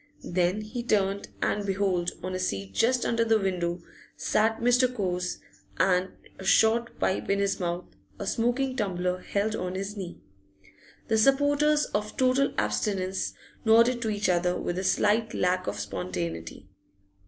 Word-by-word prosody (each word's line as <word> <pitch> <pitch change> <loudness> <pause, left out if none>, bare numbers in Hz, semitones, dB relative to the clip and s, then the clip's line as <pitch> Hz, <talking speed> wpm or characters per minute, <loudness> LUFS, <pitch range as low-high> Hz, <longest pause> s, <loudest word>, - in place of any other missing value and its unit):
Then 180 +3 +1
he 215 +3 -5
turned, 200 -4 0 0.2
and 205 - 0
behold, 190 -3 0
on 185 0 -3
a 185 - -2
seat 100 - -3
just 245 - +2
under 230 0 +2
the 225 -1 +3
window 175 -3 -2 0.3
sat 220 +1 +1
Mr. 245 +2 +4
Cowes, 180 -6 -2 0.5
& 185 +1 -2
short 225 +4 +3
pipe 190 - 0
in 200 - +3
his 200 0 0
mouth, 175 0 -2 0.3
a - - -5
smoking 250 +3 0
tumbler 180 -5 -1
held 205 +3 -1
on 180 -1 -3
his 195 +2 -4
knee. 185 -4 -7 0.9
The 220 -1 +2
supporters 290 +4 +3
of 210 +1 -2
total 260 +1 +3
abstinence 185 - -1 0.3
nodded 235 +2 +5
to 225 - -1
each 205 -2 0
other, 180 0 +1
with 175 +1 -2
a - - -3
slight 220 +3 +2
lack 180 0 +1
of - - -3
spontaneity. 90 -3 -5
200 Hz, 150 wpm, -27 LUFS, 180-225 Hz, 0.9 s, nodded